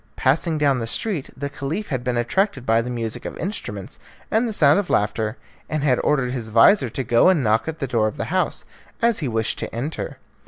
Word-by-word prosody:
Passing 155 Hz, +4 st, +1 dB
down 140 Hz, -3 st, +2 dB
the 115 Hz, -, -3 dB
street, 175 Hz, -, -2 dB
the 140 Hz, +1 st, -3 dB
Caliph 145 Hz, +9 st, -4 dB
had 130 Hz, -3 st, -2 dB
been 125 Hz, -1 st, -1 dB
attracted 130 Hz, -, 0 dB
by 115 Hz, 0 st, +3 dB
the 120 Hz, -, -5 dB
music 115 Hz, -2 st, -4 dB
of -, -, -6 dB
instruments 105 Hz, -, -5 dB, 0.3 s
and 230 Hz, +2 st, +2 dB
the -, -, -2 dB
sound 150 Hz, -4 st, +4 dB
of 200 Hz, -, -3 dB
laughter, 105 Hz, +2 st, 0 dB, 0.3 s
and 155 Hz, -2 st, -1 dB
had 130 Hz, -4 st, +3 dB
ordered 135 Hz, -4 st, +1 dB
his 120 Hz, -4 st, -4 dB
vizir 120 Hz, -, +5 dB
to 130 Hz, -, -3 dB
go 120 Hz, +8 st, +4 dB
and 170 Hz, -7 st, +3 dB
knock 110 Hz, +3 st, +2 dB
at 160 Hz, 0 st, -3 dB
the 140 Hz, -, -2 dB
door 115 Hz, -4 st, +1 dB
of 110 Hz, -, -5 dB
the -, -, -2 dB
house, -, -, 0 dB, 0.3 s
as 235 Hz, -1 st, +2 dB
he 150 Hz, -, -2 dB
wished 110 Hz, -1 st, -1 dB
to -, -, -4 dB
enter. 140 Hz, +7 st, -4 dB
130 Hz, 225 wpm, -22 LUFS, 115-160 Hz, 0.3 s, vizir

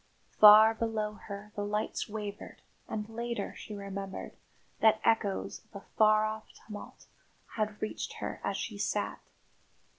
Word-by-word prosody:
Far 215 Hz, +1 st, +10 dB
below 220 Hz, -2 st, -2 dB
her 205 Hz, 0 st, -7 dB
the 205 Hz, -, -2 dB
lights 210 Hz, +1 st, -2 dB
wavered 205 Hz, -1 st, -7 dB, 0.2 s
and 210 Hz, -1 st, -4 dB
later 235 Hz, +1 st, -4 dB
she 215 Hz, -, -8 dB
remembered 195 Hz, -1 st, -6 dB, 0.4 s
that 220 Hz, -1 st, +5 dB
echoes 210 Hz, -4 st, +1 dB
of 220 Hz, -1 st, -27 dB
a 200 Hz, -, -8 dB
far 215 Hz, 0 st, +5 dB
off 215 Hz, 0 st, -4 dB, 0.2 s
tumult 210 Hz, -1 st, -10 dB, 0.5 s
had 215 Hz, -1 st, -2 dB
reached 215 Hz, -, -4 dB
her -, -, -5 dB
as -, -, -1 dB
she -, -, -5 dB
sat. -, -, -1 dB
215 Hz, 140 wpm, -31 LUFS, 205-220 Hz, 0.5 s, Far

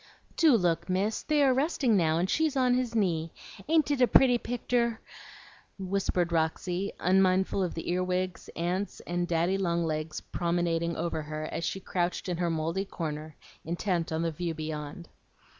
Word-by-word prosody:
"Do 310 Hz, -8 st, +5 dB
look, 175 Hz, -2 st, 0 dB
Miss; 200 Hz, +4 st, 0 dB
they 300 Hz, -1 st, +2 dB
are 265 Hz, -2 st, +5 dB
resting 265 Hz, -4 st, +2 dB
now, 160 Hz, -4 st, +3 dB
and 175 Hz, +2 st, +1 dB
she's 310 Hz, +5 st, +1 dB
on 250 Hz, -1 st, +3 dB
his 250 Hz, -2 st, 0 dB
knee. 165 Hz, -6 st, 0 dB, 0.4 s
Ain't 310 Hz, -2 st, +3 dB
it 280 Hz, -3 st, +1 dB
a 250 Hz, -, +6 dB
pretty 245 Hz, -1 st, +5 dB
picter?" 235 Hz, -1 st, -1 dB, 0.8 s
whispered 185 Hz, -2 st, -1 dB
Roxy, 175 Hz, +4 st, -1 dB
unmindful 190 Hz, +1 st, +3 dB
of 180 Hz, -, -1 dB
the 165 Hz, -, -5 dB
earwigs, 185 Hz, 0 st, -1 dB
ants, 180 Hz, +4 st, -2 dB
and 175 Hz, 0 st, -2 dB
daddy 175 Hz, +3 st, +1 dB
long 170 Hz, -2 st, +1 dB
legs 155 Hz, 0 st, -3 dB
promenading 170 Hz, -1 st, -1 dB
over 165 Hz, -1 st, -2 dB
her 155 Hz, 0 st, -5 dB
as -, -, -3 dB
she 195 Hz, -, -2 dB
crouched 180 Hz, -1 st, -2 dB
in 180 Hz, -2 st, -2 dB
her 175 Hz, -1 st, 0 dB
mouldy 165 Hz, +4 st, -1 dB
corner, 155 Hz, -4 st, -5 dB, 0.3 s
intent 170 Hz, 0 st, -1 dB
on 160 Hz, +1 st, -1 dB
the 165 Hz, -, 0 dB
view 165 Hz, +1 st, -3 dB
beyond. 155 Hz, +1 st, -6 dB
180 Hz, 165 wpm, -29 LUFS, 165-205 Hz, 0.8 s, a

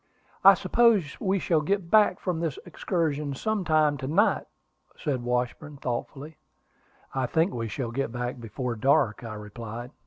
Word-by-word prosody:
"I -, -, +9 dB
suppose 220 Hz, -11 st, +3 dB
we 195 Hz, 0 st, +1 dB
shall 165 Hz, -4 st, +1 dB
get 180 Hz, +2 st, -1 dB
back 210 Hz, -4 st, +5 dB
from 180 Hz, -4 st, -2 dB
this 165 Hz, -5 st, -2 dB
excursion 150 Hz, -5 st, -2 dB
some 215 Hz, +5 st, -1 dB
time 155 Hz, -3 st, +3 dB
to 130 Hz, -, -5 dB
night," 195 Hz, +10 st, +2 dB, 0.5 s
said 140 Hz, -6 st, -2 dB
Washburn, 125 Hz, +4 st, -2 dB
thoughtfully. 135 Hz, +4 st, -5 dB, 0.8 s
"I 130 Hz, -2 st, 0 dB
think 165 Hz, +7 st, +1 dB
we 115 Hz, -1 st, -3 dB
shall 115 Hz, +2 st, -4 dB
get 130 Hz, -1 st, -2 dB
back 120 Hz, +1 st, -4 dB
before 120 Hz, +2 st, -4 dB
dark," 135 Hz, -1 st, +2 dB
I 110 Hz, -2 st, -6 dB
replied. 115 Hz, +3 st, -8 dB
140 Hz, 155 wpm, -27 LUFS, 120-170 Hz, 0.8 s, I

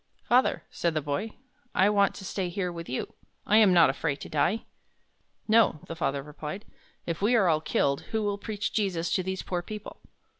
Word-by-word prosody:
"Father," 250 Hz, +2 st, +2 dB
said 170 Hz, -2 st, -1 dB
the 155 Hz, -, +1 dB
boy, 195 Hz, +10 st, -3 dB, 0.4 s
"I 190 Hz, -, +5 dB
want 200 Hz, -1 st, +3 dB
to 190 Hz, -, -9 dB
stay 185 Hz, -1 st, -2 dB
here 180 Hz, 0 st, -2 dB
with 170 Hz, -1 st, -7 dB
you. 130 Hz, -, -3 dB, 0.3 s
I 210 Hz, -, +4 dB
am 215 Hz, -4 st, +7 dB
not 170 Hz, -6 st, +6 dB
afraid 145 Hz, +1 st, -2 dB
to -, -, -7 dB
die." 175 Hz, +8 st, +1 dB, 0.8 s
"No," 220 Hz, -8 st, +4 dB
the 165 Hz, -, -6 dB
father 140 Hz, -4 st, -1 dB
replied. 150 Hz, +7 st, -7 dB, 0.4 s
"If 170 Hz, 0 st, -3 dB
we 220 Hz, +5 st, +3 dB
are 205 Hz, -5 st, +4 dB
all 155 Hz, -2 st, +3 dB
killed, 140 Hz, -3 st, +1 dB
who 220 Hz, -1 st, -1 dB
will 205 Hz, -1 st, -1 dB
preach 210 Hz, 0 st, -3 dB
Jesus 180 Hz, -6 st, 0 dB
to -, -, +2 dB
these 190 Hz, +1 st, -4 dB
poor 180 Hz, -1 st, -2 dB
people?" 210 Hz, +3 st, -9 dB
185 Hz, 195 wpm, -28 LUFS, 160-210 Hz, 0.8 s, am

